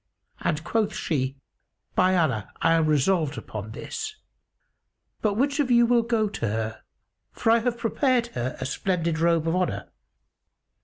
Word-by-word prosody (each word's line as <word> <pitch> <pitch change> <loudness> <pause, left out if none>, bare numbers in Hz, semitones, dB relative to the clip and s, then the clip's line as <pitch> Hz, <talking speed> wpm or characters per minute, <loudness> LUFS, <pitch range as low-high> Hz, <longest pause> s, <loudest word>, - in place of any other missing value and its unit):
and 155 +1 -1
quoth 215 +4 0
she, 135 -3 -1 0.6
"By 185 0 +3
Allah, 130 - 0
I 165 0 +3
am 165 -1 +3
resolved 150 -1 +2
upon 110 -1 -6
this; 430 - -5 1.1
but 210 -2 +1
which 280 +6 +1
of 280 -3 +2
you 240 -1 +6
will 240 0 +4
go 230 -2 +1
to 195 - -3
her, 110 +1 -3 0.5
for 225 - +1
I 230 - +5
have 240 +1 -1
prepared 245 +1 +1
her 120 +1 -3
a 130 - -3
splendid 170 +2 -1
robe 165 -1 +2
of 165 - +1
honour?" 115 - -1
170 Hz, 155 wpm, -25 LUFS, 140-230 Hz, 1.1 s, you